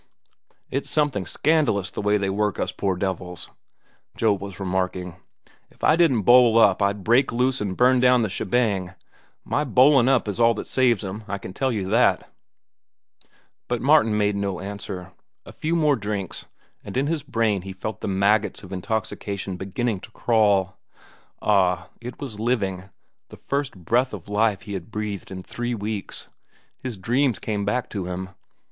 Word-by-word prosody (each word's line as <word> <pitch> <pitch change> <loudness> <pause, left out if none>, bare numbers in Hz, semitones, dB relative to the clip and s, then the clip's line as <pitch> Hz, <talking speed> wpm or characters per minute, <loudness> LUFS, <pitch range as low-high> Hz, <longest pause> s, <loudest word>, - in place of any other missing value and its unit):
"It's 135 - -2
something 145 -11 0
scandalous 145 - +1
the - - -4
way 105 0 +2
they 100 -1 -1
work 105 0 0
us - - -1
poor 95 -2 -1
devils," 90 -2 -4 0.7
Joe 110 -2 +3
was 100 -2 -7
remarking. 90 -2 -2 0.5
"If - - -25
I - - +5
didn't 150 -11 +3
bowl 120 +1 +6
up, 105 -3 +5
I'd 100 0 0
break 120 +6 +3
loose 125 +1 0
an' 100 -2 -2
burn 125 +3 +4
down 125 -1 +4
the - - +1
shebang. 100 -3 -1 0.5
My 150 - 0
bowlin' 135 -1 +5
up 130 -5 +2
is 105 +2 -3
all 115 0 +5
that - - -5
saves 120 -5 +2
'em, 100 +3 -6
I 100 - -3
can 95 -1 -9
tell 130 +5 0
you 105 -5 -2
that." 115 +4 +3 1.4
But 120 -1 -1
Martin 135 -7 +4
made 105 -1 +1
no 100 -2 -2
answer. 95 -2 -7 0.3
A - - -11
few 160 +2 -2
more 150 -3 +3
drinks, 105 -5 -4 0.4
and - - -6
in 135 - +2
his 160 0 -1
brain 115 -7 0
he 95 +1 -7
felt 100 +3 -6
the - - -3
maggots 100 +3 +1
of 95 0 -9
intoxication 100 -1 -3
beginning 100 +3 -2
to 100 - -12
crawl. 105 -5 +1 0.6
Ah, 95 -3 +2
it 125 +1 -8
was 125 -8 -7
living, 100 -6 -1 0.4
the - - -12
first 140 -3 -3
breath 120 +8 0
of 95 -3 -12
life 105 -1 +1
he 105 - -7
had 95 -1 -6
breathed 105 -2 -5
in 95 -1 -7
three 120 +3 -3
weeks. 105 -1 -5 0.5
His 125 -5 -5
dreams 120 +5 +1
came 105 -2 -3
back 125 +5 -1
to 100 -4 -3
him. 90 +1 -5
105 Hz, 170 wpm, -24 LUFS, 95-125 Hz, 1.4 s, bowl